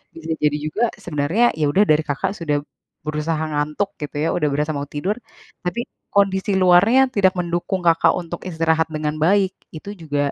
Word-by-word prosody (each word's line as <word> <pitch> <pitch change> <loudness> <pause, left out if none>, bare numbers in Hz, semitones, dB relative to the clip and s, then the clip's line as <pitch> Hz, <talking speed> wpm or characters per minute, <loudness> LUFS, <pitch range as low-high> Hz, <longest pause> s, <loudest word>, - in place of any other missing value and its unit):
bisa 165 0 -4
jadi 150 0 +3
juga, 155 +10 -1 0.2
sebenarnya, 160 +7 0 0.2
ya 150 - +2
udah 195 +7 +4
dari 155 +1 +3
Kakak 150 +6 -2
sudah 150 -6 -1 0.5
berusaha 155 +1 -1
ngantuk, 150 +7 -2
gitu 150 - -6
ya, 165 - +1
udah 150 -4 +1
berasa 150 +2 -1
mau 140 0 -4
tidur, 180 +8 -2 0.5
tapi 215 +7 -3 0.3
kondisi 195 0 +2
luarnya 205 +9 +5
tidak 195 -5 +3
mendukung 175 +2 -2
Kakak 165 -1 +4
untuk 175 -1 -5
istirahat 160 -1 +1
dengan 155 -1 -3
baik. 190 +4 +3 0.2
Itu 180 +6 -7
juga 145 -3 -1
165 Hz, 170 wpm, -21 LUFS, 150-190 Hz, 0.5 s, luarnya